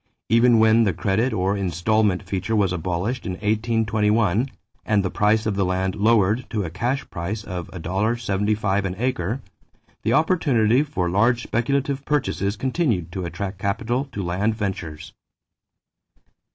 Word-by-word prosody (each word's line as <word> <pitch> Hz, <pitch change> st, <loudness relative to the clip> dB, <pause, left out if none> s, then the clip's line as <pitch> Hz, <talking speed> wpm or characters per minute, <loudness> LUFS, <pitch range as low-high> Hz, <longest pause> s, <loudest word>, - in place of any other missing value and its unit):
Even 115 Hz, +1 st, +5 dB
when 110 Hz, +1 st, +5 dB
the 100 Hz, -4 st, +1 dB
credit 100 Hz, +8 st, 0 dB
or 95 Hz, +2 st, 0 dB
installment 100 Hz, +2 st, +1 dB
feature 95 Hz, +3 st, -2 dB
was 100 Hz, -4 st, +2 dB
abolished 90 Hz, +8 st, -2 dB
in 95 Hz, -, -2 dB
1821 110 Hz, +1 st, +1 dB, 0.3 s
and 105 Hz, -2 st, +1 dB
the 90 Hz, -, -1 dB
price 105 Hz, +2 st, +2 dB
of 105 Hz, -2 st, 0 dB
the 100 Hz, -, +1 dB
land 95 Hz, +1 st, 0 dB
lowered 105 Hz, +2 st, +2 dB
to 105 Hz, -3 st, -1 dB
a 80 Hz, -, -5 dB
cash 120 Hz, +10 st, -2 dB
price 100 Hz, +6 st, -4 dB
of 90 Hz, -3 st, -5 dB
$1.75 100 Hz, +1 st, -1 dB
an 90 Hz, -1 st, -3 dB
acre, 120 Hz, 0 st, -2 dB, 0.6 s
the 110 Hz, -, 0 dB
opportunity 140 Hz, -, +3 dB
for 135 Hz, -12 st, -2 dB
large 115 Hz, +7 st, +2 dB
speculative 140 Hz, +3 st, -1 dB
purchases 130 Hz, -8 st, -1 dB
continued 125 Hz, -, -1 dB
to 95 Hz, -1 st, -4 dB
attract 95 Hz, +2 st, -5 dB
capital 120 Hz, +7 st, -1 dB
to 115 Hz, -8 st, -6 dB
land 95 Hz, +5 st, 0 dB
ventures. 85 Hz, -6 st, -5 dB
105 Hz, 140 wpm, -23 LUFS, 95-115 Hz, 0.6 s, Even